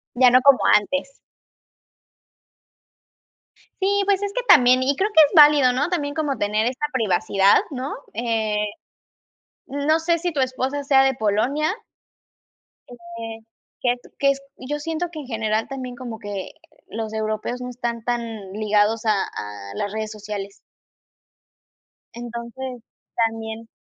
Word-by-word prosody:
Ya 250 Hz, 0 st, +6 dB
no 255 Hz, -, +7 dB
como 280 Hz, 0 st, +6 dB, 0.2 s
antes. 275 Hz, +6 st, -1 dB, 2.6 s
Sí, 400 Hz, +1 st, +2 dB
pues, 395 Hz, -1 st, +2 dB
es 405 Hz, -, -2 dB
que -, -, -1 dB
también, 250 Hz, +1 st, +6 dB
y 280 Hz, +2 st, +1 dB
creo 400 Hz, +7 st, 0 dB
que 320 Hz, -, +8 dB
es -, -, -12 dB
válido, 295 Hz, -4 st, +7 dB
¿no? 290 Hz, +6 st, 0 dB
también 290 Hz, -5 st, -2 dB
como 295 Hz, -5 st, -1 dB
tener 210 Hz, +2 st, 0 dB
esta 255 Hz, +4 st, -1 dB
privacidad, 195 Hz, -3 st, +3 dB
¿no?, 265 Hz, +1 st, -4 dB, 0.2 s
eh, 225 Hz, -2 st, -1 dB, 1.1 s
no 285 Hz, +4 st, +1 dB
sé 335 Hz, +1 st, +1 dB
si 350 Hz, +1 st, -2 dB
tu 290 Hz, -, -1 dB
esposa 260 Hz, +2 st, -1 dB
sea 270 Hz, -1 st, +5 dB
de 265 Hz, 0 st, +2 dB
Polonia 245 Hz, -, 0 dB, 1.2 s
eh, 230 Hz, -2 st, -9 dB, 0.4 s
que 245 Hz, -, +2 dB
es 245 Hz, -, -10 dB, 0.2 s
que 280 Hz, -, +4 dB
es 275 Hz, 0 st, -5 dB, 0.2 s
yo 295 Hz, +3 st, -4 dB
siento 325 Hz, +3 st, -3 dB
que 315 Hz, -, -7 dB
en 285 Hz, -, -8 dB
general 220 Hz, -2 st, -1 dB
también 255 Hz, -2 st, -6 dB
como 240 Hz, -2 st, -7 dB
que, 205 Hz, -3 st, -5 dB
eh, -, -, -13 dB, 0.3 s
los 220 Hz, 0 st, -5 dB
europeos 220 Hz, +3 st, -3 dB
no 250 Hz, -, -5 dB
están 235 Hz, -2 st, -4 dB
tan 240 Hz, 0 st, -1 dB, 0.3 s
ligados 215 Hz, +1 st, +1 dB
a 210 Hz, -3 st, +2 dB
a 100 Hz, -1 st, -8 dB
las 200 Hz, -, -3 dB
redes 215 Hz, 0 st, -4 dB
sociales. 205 Hz, -2 st, -7 dB, 1.5 s
Entonces, 240 Hz, +1 st, -7 dB, 0.3 s
también 225 Hz, 0 st, -2 dB
245 Hz, 145 wpm, -22 LUFS, 220-280 Hz, 2.6 s, que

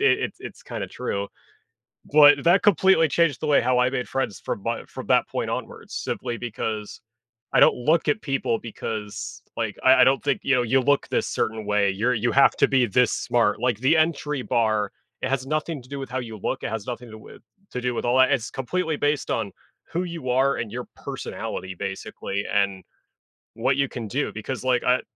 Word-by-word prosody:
it's 130 Hz, -2 st, +2 dB
it's -, -, -9 dB
kinda -, -, -5 dB
true, 100 Hz, 0 st, -3 dB, 0.9 s
but 145 Hz, -1 st, +7 dB
that 175 Hz, +3 st, +4 dB
completely 190 Hz, -4 st, +5 dB
changed 165 Hz, -5 st, +2 dB
the 155 Hz, -, -2 dB
way 145 Hz, -, +4 dB
how 125 Hz, +1 st, +2 dB
I 125 Hz, -, +3 dB
made 130 Hz, -1 st, -3 dB
friends 120 Hz, -8 st, -2 dB
from 100 Hz, -, -4 dB
my 115 Hz, 0 st, -2 dB
from -, -, -9 dB
that -, -, +3 dB
point -, -, -3 dB
onwards, -, -, -6 dB
simply 120 Hz, -1 st, -3 dB
because 110 Hz, -2 st, -4 dB, 0.5 s
I -, -, +5 dB
don't -, -, +6 dB
look 155 Hz, +6 st, +1 dB
at 215 Hz, -, +1 dB
people 135 Hz, -5 st, -1 dB
because 110 Hz, 0 st, -6 dB, 0.2 s
like, 110 Hz, -3 st, -2 dB
I 130 Hz, +1 st, +7 dB
I -, -, +9 dB
don't 135 Hz, +1 st, +3 dB
think, 140 Hz, -2 st, +1 dB
you 135 Hz, -, +3 dB
know, 125 Hz, -, +3 dB
you 130 Hz, +3 st, +3 dB
look 140 Hz, +2 st, +2 dB
this -, -, 0 dB
certain 110 Hz, -1 st, -2 dB
way, 105 Hz, -1 st, +2 dB
you're 115 Hz, +6 st, +1 dB
you 120 Hz, 0 st, 0 dB
have 140 Hz, -, +6 dB
to -, -, +4 dB
be 130 Hz, -3 st, +3 dB
this 120 Hz, +3 st, +3 dB
smart, 115 Hz, -3 st, +1 dB
like, 125 Hz, -4 st, +1 dB
the 135 Hz, +6 st, +3 dB
entry 150 Hz, -3 st, 0 dB
bar, 110 Hz, -3 st, +1 dB, 0.3 s
it -, -, -1 dB
has 135 Hz, -1 st, -1 dB
nothing 155 Hz, -1 st, -2 dB
to 125 Hz, -, -18 dB
do 140 Hz, 0 st, -5 dB
with 135 Hz, -, -6 dB
how 130 Hz, +1 st, -2 dB
you 115 Hz, -3 st, -7 dB
look, 130 Hz, -, -2 dB
it -, -, -2 dB
has 110 Hz, -1 st, -5 dB
nothing 120 Hz, 0 st, -5 dB
to -, -, -12 dB
do 110 Hz, -, -11 dB
with -, -, -14 dB, 0.3 s
to 125 Hz, -, -4 dB
do 125 Hz, 0 st, -1 dB
with -, -, -3 dB
all 125 Hz, +2 st, +2 dB
that. 130 Hz, -, +5 dB
It's 120 Hz, -4 st, 0 dB
completely 160 Hz, +5 st, -2 dB
based 145 Hz, -1 st, 0 dB
on 110 Hz, -4 st, -1 dB, 0.4 s
who 175 Hz, +2 st, -1 dB
you 170 Hz, -7 st, -5 dB
are 135 Hz, +2 st, +3 dB
and 110 Hz, -3 st, -4 dB
your 125 Hz, +1 st, -5 dB
personality, 95 Hz, 0 st, -6 dB
basically, 100 Hz, +1 st, -4 dB
and 100 Hz, -2 st, +1 dB, 0.7 s
what 130 Hz, +4 st, +1 dB
you 140 Hz, -1 st, +2 dB
can 115 Hz, -4 st, -6 dB
do, 145 Hz, +6 st, -1 dB
because, 110 Hz, +3 st, -5 dB
like, 125 Hz, -1 st, +2 dB
I, 125 Hz, -, +4 dB
eh, -, -, +1 dB
eh -, -, -8 dB
125 Hz, 220 wpm, -24 LUFS, 110-140 Hz, 0.9 s, I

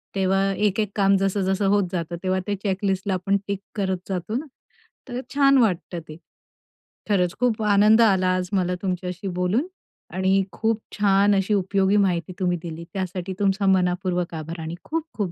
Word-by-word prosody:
तेव्हा 195 Hz, 0 st, +2 dB
एक-एक 210 Hz, +1 st, 0 dB
काम 195 Hz, -1 st, +4 dB
जसं-जसं 195 Hz, 0 st, 0 dB
होत 200 Hz, +1 st, +3 dB
जातं 170 Hz, -2 st, -3 dB
तेव्हा 185 Hz, 0 st, +1 dB
ते 205 Hz, -, 0 dB
चेक 195 Hz, -1 st, -2 dB
लिस्टला 195 Hz, 0 st, 0 dB
आपण 190 Hz, +2 st, +1 dB
टिक 200 Hz, -1 st, -2 dB, 0.2 s
करत 190 Hz, -2 st, 0 dB
जातो 190 Hz, +3 st, -3 dB
ना, 300 Hz, -, -4 dB, 0.6 s
तर 245 Hz, -1 st, -4 dB, 0.2 s
छान 275 Hz, -1 st, +5 dB
वाटतं 185 Hz, -7 st, +1 dB
ते. 155 Hz, -, -9 dB, 0.9 s
खरंच 180 Hz, -4 st, +1 dB
खूप 240 Hz, -3 st, +1 dB
आनंद 210 Hz, +2 st, +5 dB
आला 190 Hz, -5 st, +4 dB
आज 185 Hz, -1 st, -2 dB
मला 180 Hz, -2 st, +1 dB
तुमच्याशी 180 Hz, 0 st, -3 dB
बोलून 205 Hz, -, +1 dB, 0.5 s
आणि 190 Hz, +1 st, +2 dB
खूप 225 Hz, +5 st, 0 dB, 0.2 s
छान 200 Hz, 0 st, +4 dB
अशी 195 Hz, +2 st, +1 dB
उपयोगी 195 Hz, 0 st, +2 dB
माहिती 185 Hz, -3 st, +1 dB
तुम्ही 180 Hz, -2 st, +1 dB
दिली 165 Hz, -1 st, -6 dB
त्यासाठी 185 Hz, -1 st, -4 dB
तुमचा 195 Hz, 0 st, +1 dB
मनःपूर्वक 180 Hz, -1 st, +1 dB
आभार 165 Hz, +2 st, -6 dB
आणि 160 Hz, +1 st, -5 dB
खूप-खूप 305 Hz, -, -3 dB
195 Hz, 160 wpm, -23 LUFS, 180-205 Hz, 0.9 s, छान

